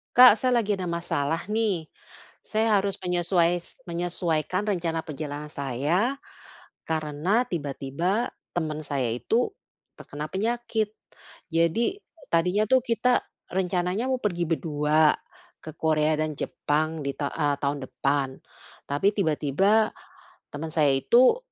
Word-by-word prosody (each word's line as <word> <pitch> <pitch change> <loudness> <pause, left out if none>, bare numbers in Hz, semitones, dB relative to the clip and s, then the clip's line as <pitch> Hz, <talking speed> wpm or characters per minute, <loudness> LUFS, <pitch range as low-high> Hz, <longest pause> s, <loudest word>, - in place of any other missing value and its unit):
Kak, 250 -3 +10
saya 250 +2 +2
lagi 210 -2 0
ada 180 -2 -3
masalah 165 0 -2
nih. 210 -7 0 0.6
Saya 220 0 +2
harus 195 0 -1
menyesuai 175 -1 +2 0.3
menyesuaikan 175 +1 -1
rencana 170 -5 0
perjalanan 150 0 -5
saya 155 - 0 0.7
karena 160 +8 +1
tiba-tiba 165 - -2 0.2
teman 155 -3 -1
saya 135 -5 -1
itu 225 - 0 0.5
terkena 150 +1 -6
penyakit. 220 +1 -1 0.6
Jadi 170 - +1 0.3
tadinya 180 +5 +3
tuh 260 - +7
kita 240 +1 +2 0.3
rencananya 180 +4 0
mau - - +3
pergi 175 -5 0
berdua 155 -1 +3 0.5
ke 155 - -7
Korea 155 -1 +2
dan 155 -1 -1
Jepang 155 +2 -1
di 140 - 0
ta 145 - -2
eee, 145 -2 +1
tahun 140 0 -1
depan. 140 -1 0 0.6
Tapi 145 +7 +1
tiba-tiba 195 +5 +2 0.6
teman 155 +2 -5
saya 150 -3 +4
itu 245 - +5
170 Hz, 115 wpm, -26 LUFS, 150-210 Hz, 0.7 s, Kak